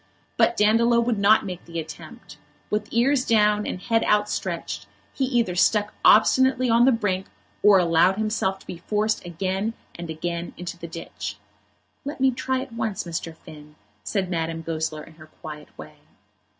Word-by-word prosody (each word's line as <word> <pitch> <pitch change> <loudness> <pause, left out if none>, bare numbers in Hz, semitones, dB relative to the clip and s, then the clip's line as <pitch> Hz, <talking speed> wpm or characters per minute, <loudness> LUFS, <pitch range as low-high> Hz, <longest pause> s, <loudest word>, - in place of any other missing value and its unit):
But 235 - +3
Dandolo 230 +3 +4
would 235 -2 0
not 205 +2 +5
make 180 -2 -6
the 170 0 -5
attempt. 155 -1 -10 0.3
With 210 0 -1
ears 255 +3 +2
down 210 -2 +2
and - - -4
head 225 +4 +1
outstretched, 210 0 -1 0.3
he 270 - 0
either 240 -8 +1
stuck 210 +3 +2
obstinately 255 +3 +5
on 235 +1 +5
the 265 - +6
brink, 195 -5 -1 0.3
or 205 -1 +7
allowed 175 +1 +3
himself 215 -3 -1
to - - -20
be 170 - -8
forced 215 +4 -1
again 190 +5 -3 0.2
and 170 -1 -8
again 170 +2 -4
into 175 0 -6
the 170 -1 -8
ditch. 165 0 -7 0.7
"Let 285 0 -6
me 265 0 +4
try 260 +1 -2
it 270 -1 -8
once, 225 -4 -3
Mr. 165 -1 -5
Finn," 150 -1 -14 0.3
said 195 -3 -1
Madame 165 -2 -3
Goesler 155 -1 -3
in 165 - -15
her 155 -1 -14
quiet 150 -1 -10
way. - - -11
200 Hz, 165 wpm, -24 LUFS, 170-230 Hz, 0.7 s, or